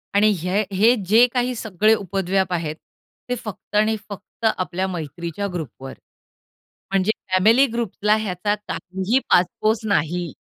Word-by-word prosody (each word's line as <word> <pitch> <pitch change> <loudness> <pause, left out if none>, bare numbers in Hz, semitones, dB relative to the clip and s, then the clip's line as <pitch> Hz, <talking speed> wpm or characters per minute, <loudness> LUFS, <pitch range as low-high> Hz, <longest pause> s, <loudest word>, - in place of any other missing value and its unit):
आणि 210 +1 +5
हे 185 +5 0
हे 225 +6 +5 0.2
जे 230 +3 +8
काही 250 0 0
सगळे 215 -1 +2
उपद्व्याप 190 -1 -1
आहेत 160 -3 -2 0.5
ते 250 - 0
फक्त 215 -2 -9
आणि 215 +1 +3
फक्त 205 +3 -8
आपल्या 185 +1 -2
मैत्रीच्या 170 +3 -4
ग्रुपवर, 135 -5 -6 1.0
म्हणजे 195 +2 +1 0.2
फॅमिली 225 +9 +5
ग्रुपला 215 -2 0
ह्याचा 205 -1 -1
काहीही 195 +1 -2
पासपोस 215 +5 +2
नाही. 170 -1 -1
195 Hz, 125 wpm, -22 LUFS, 180-215 Hz, 1.0 s, जे